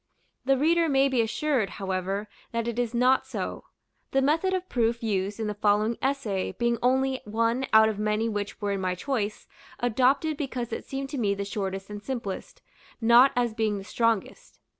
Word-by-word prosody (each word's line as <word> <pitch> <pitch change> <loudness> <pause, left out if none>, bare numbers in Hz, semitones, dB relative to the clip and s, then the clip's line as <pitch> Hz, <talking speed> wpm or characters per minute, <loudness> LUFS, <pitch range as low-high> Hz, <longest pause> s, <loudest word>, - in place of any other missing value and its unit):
The 270 0 +3
reader 330 +3 +3
may 270 -1 +4
be 255 -3 +2
assured, 230 -1 0
however, 195 +2 -2 0.3
that 230 0 -1
it 235 0 -2
is 240 -1 -1
not 255 +2 +3
so; - - -5 0.4
the 270 - +2
method 325 +7 +2
of 370 -1 -2
proof 235 -3 0
used 200 -1 -1
in 220 - -1
the 210 - -2
following 210 +2 +2
essay 260 -9 -1
being 235 -1 0
only 260 +1 +2
one 230 +4 0
out 220 0 +7
of 215 -2 -2
many 215 +1 0
which 205 -2 -4
were 205 -2 -1
in 195 -1 -2
my 185 -1 -1
choice, 215 -1 -3 0.3
adopted 265 +6 +2
because 255 -6 -4
it - - -5
seemed 270 0 -4
to 285 -2 -4
me 200 -3 +1
the 200 0 -4
shortest 195 -1 -4
and 205 0 -6
simplest, 240 - -5 0.4
not 240 +3 +6
as 240 -2 +1
being 220 -2 0
the 195 - -7
strongest. 230 - -1
230 Hz, 185 wpm, -27 LUFS, 210-265 Hz, 0.4 s, out